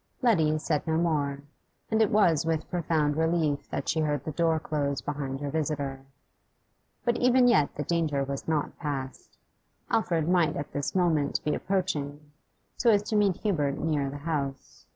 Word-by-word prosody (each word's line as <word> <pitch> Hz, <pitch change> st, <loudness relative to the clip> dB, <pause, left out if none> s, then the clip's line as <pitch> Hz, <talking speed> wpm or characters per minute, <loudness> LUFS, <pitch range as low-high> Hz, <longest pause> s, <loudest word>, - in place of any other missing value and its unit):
Letty 160 Hz, -10 st, +3 dB
said 155 Hz, 0 st, -1 dB
no 160 Hz, 0 st, +1 dB
more, 145 Hz, -4 st, 0 dB, 0.5 s
and 220 Hz, 0 st, +3 dB
it 215 Hz, -, +4 dB
was 175 Hz, -7 st, +3 dB
with 160 Hz, -1 st, -1 dB
profound 155 Hz, -4 st, +1 dB
relief 160 Hz, -2 st, 0 dB
that -, -, -4 dB
she 160 Hz, -, +1 dB
heard 150 Hz, -3 st, 0 dB
the 155 Hz, -, -3 dB
door 165 Hz, +1 st, +1 dB
close 140 Hz, -2 st, -2 dB
behind 140 Hz, -2 st, -4 dB
her 145 Hz, -1 st, -3 dB
visitor. 140 Hz, -3 st, -3 dB, 1.0 s
But 240 Hz, -1 st, +2 dB
even 250 Hz, 0 st, +4 dB
yet 190 Hz, -12 st, +3 dB
the 150 Hz, -, -3 dB
danger 155 Hz, -3 st, 0 dB
was 135 Hz, 0 st, -5 dB
not 155 Hz, -2 st, -1 dB
past; 135 Hz, -5 st, -5 dB, 0.5 s
Alfred 170 Hz, -9 st, +1 dB
might 175 Hz, -4 st, +3 dB
at 145 Hz, -, -5 dB
this 145 Hz, +4 st, -3 dB
moment 160 Hz, -6 st, +2 dB
be 150 Hz, -, +1 dB
approaching, 150 Hz, -6 st, -2 dB, 0.5 s
so 240 Hz, -, +3 dB
as 205 Hz, -2 st, +4 dB
to 215 Hz, -, 0 dB
meet 200 Hz, -4 st, +3 dB
Hubert 150 Hz, -9 st, 0 dB
near 150 Hz, -4 st, 0 dB
the 140 Hz, -, -6 dB
house. 140 Hz, -3 st, -4 dB
155 Hz, 170 wpm, -28 LUFS, 145-170 Hz, 1.0 s, it